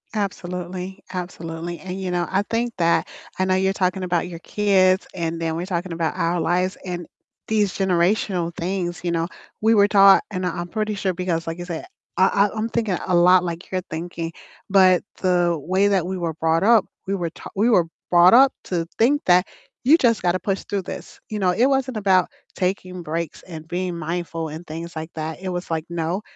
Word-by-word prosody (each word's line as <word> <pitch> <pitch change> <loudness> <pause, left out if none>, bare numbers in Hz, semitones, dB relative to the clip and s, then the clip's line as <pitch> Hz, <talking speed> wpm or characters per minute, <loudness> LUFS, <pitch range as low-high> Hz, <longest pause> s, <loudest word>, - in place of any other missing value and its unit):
Absolutely, 185 -1 -4
absolutely. 170 -1 -5
And, 190 0 -6
you 185 - -3
know, 175 -1 0
I 195 +1 +2
think 230 0 -1
that 170 -1 +2 0.3
I 185 - +1
know 185 - +2
you're 190 +1 +2
talking 185 -1 0
about 175 -1 0
your 170 -2 -8
kids, 190 -1 +2
and 165 -1 -3
then 160 -1 -1
we're 175 +2 -3
talking 175 -1 -3
about 165 -1 -1
our 170 +1 +1
lives 180 +3 0
and 175 -2 -4 0.4
these 210 -4 +1
generational 180 -1 +1
things, 175 0 -3
you 175 - 0
know, 165 0 0 0.3
we 225 +1 +4
were 205 -1 +5
taught 195 -1 +7
and 185 -2 -3
I - - +1
I'm 175 +1 -5
pretty 215 +1 -2
sure 195 -2 -1
because, 170 -2 -2
like 165 +1 -3
you 175 - -6
said, 170 -3 -5 0.3
I 195 +2 +4
I 215 - -9
I'm 225 +2 -1
thinking 220 -6 0
a 180 - +2
lot 180 +1 +6
like 170 +1 -5
you're 185 -1 -1
thinking. 165 0 -5 0.4
But 185 -2 +5 0.2
the 175 -2 +2
way 190 +6 +2
that 190 -4 +2
we 190 0 -3
were 170 -2 -2
brought 165 +2 +1
up, 225 -2 +5 0.2
we 200 - 0
were 170 -3 -2
ta - - -10
we 220 +5 +3
were 175 -6 +4 0.3
brought 175 +3 +7
up 265 +1 +7
to 170 -3 -1
think 285 +6 +3
that 180 +1 +4 0.4
you 300 +6 +6
just 230 -7 +2
gotta 180 +1 +1
push 195 +2 -2
through 200 -2 -2
this. - - -8
You 215 -1 -3
know, 185 -2 +2
it 235 +7 +3
wasn't 265 -4 0
about 190 -3 +3 0.3
taking 185 -1 -2
breaks 165 +1 -4
and 160 -3 -9
being 180 0 -3
mindful 165 0 -3
and 160 +3 -8
things 165 +2 -7
like 160 +1 -5
that. 160 +1 -4
It 190 - -4
was 175 -1 -4
like, 160 0 -1
"No, 170 +3 -2
180 Hz, 205 wpm, -22 LUFS, 170-195 Hz, 0.4 s, taught